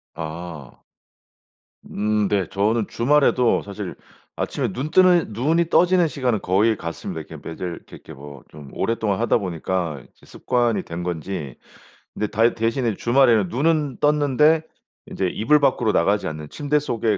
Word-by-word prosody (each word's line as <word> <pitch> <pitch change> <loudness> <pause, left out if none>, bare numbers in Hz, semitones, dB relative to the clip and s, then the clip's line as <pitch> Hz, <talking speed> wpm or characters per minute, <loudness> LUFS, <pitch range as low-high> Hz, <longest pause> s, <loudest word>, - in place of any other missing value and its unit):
아. 80 -4 -7 1.2
음 105 0 0
네. 95 -5 0
저는 105 +2 0
주말에도 125 -1 +2
사실 100 -1 -7 0.4
아침에 - - -2
눈 135 +9 -4
뜨는 180 -9 +4
눈이 160 +9 +1
떠지는 180 -1 +4
시간은 125 -7 -1
거의 105 +4 +2
같습니다. 85 -2 -6
이렇게 - - -11
매일 80 - -8
이렇게 90 -2 -7
이렇게 - - -13
뭐 70 -1 -11
좀 75 -3 -12
오랫동안 110 -3 -1
하다 120 - +2
보니까 90 -5 -3
이제 - - -23
습관이 120 -3 0
된 85 +1 -6
건지 85 -5 -5 0.6
근데 105 - -2
다 115 +3 +2
대신에 115 -1 -1
주말에는 120 -5 +3
눈은 145 0 0
떴는데 150 +1 +3 0.5
인제 95 - -2
이불 145 +11 +2
밖으로 130 -5 +2
나가지 100 -3 +1
않는 75 -1 -6
침대 150 0 -1
속에 115 -7 -1
110 Hz, 320 characters per minute, -22 LUFS, 90-135 Hz, 1.2 s, 뜨는